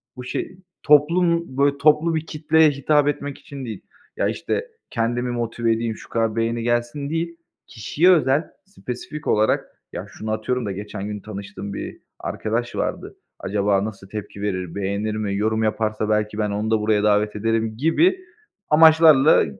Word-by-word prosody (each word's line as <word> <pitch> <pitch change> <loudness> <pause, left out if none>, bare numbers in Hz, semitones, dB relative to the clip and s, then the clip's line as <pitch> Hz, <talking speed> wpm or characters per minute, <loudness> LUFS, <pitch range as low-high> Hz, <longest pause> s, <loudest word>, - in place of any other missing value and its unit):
bu 125 - -8
şey, 150 +8 -5 0.3
toplum 170 0 +3
böyle 140 0 +3
toplu 155 +3 +3
bir 160 0 -2
kitleye 155 0 +3
hitap 145 +1 +2
etmek 145 -1 -2
için 140 -2 -9
değil, 110 -4 -6 0.4
ya, - - +1
işte, 470 - -2 0.2
kendimi 120 +1 -1
motive 120 -1 -1
edeyim, 115 0 -2
şu - - -14
kadar 115 -1 0
beğeni 115 0 -1
gelsin 120 +4 -1
değil, 165 +1 -3 0.3
kişiye 145 - +2
özel, 150 -3 +3 0.2
spesifik 150 -4 -7
olarak, 105 +1 +2 0.3
ya - - -5
şunu 110 0 -6
atıyorum 115 +3 -1
da 100 - -2
geçen 100 +1 -6
gün 105 0 -5
tanıştığım 100 -1 -7
bir - - -6 0.2
arkadaş 115 +2 -3
vardı. - - -3 0.2
Acaba 100 0 0
nasıl 100 -3 -8
tepki 105 -1 -7
verir, 95 -4 -3
beğenir 100 +2 -2
mi, 105 -2 -2
yorum 110 +2 0
yaparsa 110 0 -1
belki 105 0 0
ben 105 -1 0
onu 105 +2 -2
da 110 - +3
buraya 105 -1 +1
davet 105 0 +2
ederim 110 +1 -1
gibi 315 - +3 0.5
amaçlarla 155 -2 +6
115 Hz, 160 wpm, -22 LUFS, 105-145 Hz, 0.5 s, amaçlarla